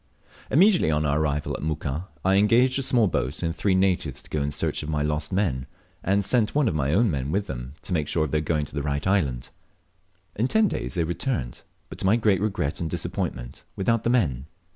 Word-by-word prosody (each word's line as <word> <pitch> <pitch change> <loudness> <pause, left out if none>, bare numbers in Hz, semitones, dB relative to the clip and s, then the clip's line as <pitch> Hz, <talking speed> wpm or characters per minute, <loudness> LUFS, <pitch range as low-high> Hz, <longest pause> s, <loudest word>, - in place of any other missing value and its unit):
Immediately 180 - +4
on 75 0 +1
our 70 +1 +1
arrival 75 -1 -1
at - - -6
Muka, 75 +2 -3 0.2
I 95 +1 +4
engaged 120 +6 +4
a - - 0
small 125 -3 +3
boat 75 -5 -2
and 85 -1 -1
three 95 +4 +1
natives 90 -8 0
to - - -15
go 75 - -1
in 70 - 0
search 75 - -1
of 75 - -6
my 75 -1 0
lost 75 0 -1
men, 80 -10 0 0.4
and 100 +1 +1
sent 115 +2 +1
one 145 -4 +3
of - - +1
my 70 -2 0
own 105 +4 +3
men 70 -2 -2
with 100 +4 0
them 65 +1 -7
to 95 - -3
make 75 -4 0
sure 80 - +1
of 75 - -6
their 75 - +1
going 75 -1 0
to - - -10
the 75 - -2
right 70 0 -2
island. 75 -11 0 0.8
In 115 +4 +1
ten 220 +7 +3
days - - -3
they 85 - +1
returned, 85 - -3 0.3
but - - -10
to - - -3
my 105 - +5
great 105 -5 +2
regret 95 -9 -1
and 80 - -2
disappointment, - - -4
without 115 +3 +1
the - - +1
men. 75 - +1
80 Hz, 230 wpm, -25 LUFS, 75-105 Hz, 0.8 s, my